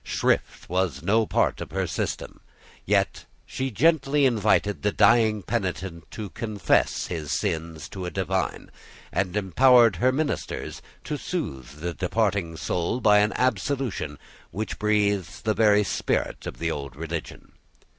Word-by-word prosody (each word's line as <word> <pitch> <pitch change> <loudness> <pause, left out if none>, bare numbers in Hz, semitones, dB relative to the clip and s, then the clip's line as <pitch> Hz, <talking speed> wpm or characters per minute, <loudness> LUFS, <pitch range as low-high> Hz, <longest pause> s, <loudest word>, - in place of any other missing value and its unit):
Shrift - - -1
was 90 -6 -1
no 110 +4 +2
part - - +1
of - - -5
her - - -1
system. - - -4 0.5
Yet - - +1 0.2
she 130 0 -3
gently 140 - +3
invited 105 -4 +2
the 105 - +1
dying 110 -3 +4
penitent 95 -6 -3
to 105 -5 -7
confess 110 0 0
his 80 -4 -4
sins 80 -1 -2
to 95 -2 -5
a - - -2
divine, 95 +1 -2 0.4
and 95 0 0
empowered 115 +2 +5
her 130 +8 +3
ministers 145 +2 -3 0.2
to 150 - -4
soothe 75 - -5
the 85 +1 -2
departing 95 -3 -1
soul 85 +8 -1
by 105 -3 +5
an 105 +1 +2
absolution 130 - -1 0.3
which 105 +6 -5
breathes 105 -3 +1
the 110 - +1
very 105 0 +4
spirit - - -2
of - - -6
the 80 0 -1
old 70 -3 -5
religion. 80 +1 -6
100 Hz, 140 wpm, -25 LUFS, 85-115 Hz, 0.5 s, empowered